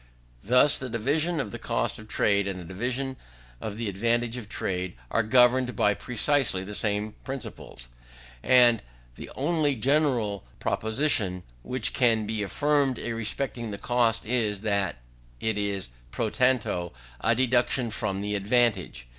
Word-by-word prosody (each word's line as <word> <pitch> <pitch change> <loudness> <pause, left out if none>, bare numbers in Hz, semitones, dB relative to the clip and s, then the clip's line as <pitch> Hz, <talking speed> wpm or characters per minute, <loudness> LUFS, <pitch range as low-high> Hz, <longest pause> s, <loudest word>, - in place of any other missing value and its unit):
Thus, 125 +6 +4
the 130 - -5
division 150 +9 0
of 110 -7 -3
the - - -6
cost - - -1
of 110 - -12
trade, 100 -2 +1
and 95 -2 -4
the - - -8
division 125 +8 -3 0.4
of 105 -1 -5
the 115 -1 -3
advantage 115 +4 0
of 115 -5 -7
trade, 90 -5 -3 0.2
are 115 - +2
governed 125 +2 +4
by 105 - +3
precisely 125 -3 +1
the 105 +2 -7
same 105 0 0
principles; 130 - -7 0.5
and 120 -3 +5 0.3
the - - -10
only 150 0 +1
general 125 - +1 0.2
proposition 110 - +1 0.2
which 125 - -1
can 115 -4 +2
be 110 0 -2
affirmed 140 +4 +1
respecting 115 +1 -3
the 100 - -5
cost 115 0 +1
is, 110 -4 0
that 100 -5 0 0.4
it 110 -1 -1
is 100 -6 -2 0.2
pro 110 - -2
tanto 120 -9 +1 0.3
a 115 +10 +2
deduction 125 -1 +1
from 100 -3 -2
the 105 0 -3
advantage. 105 - +1
115 Hz, 145 wpm, -26 LUFS, 105-125 Hz, 0.5 s, and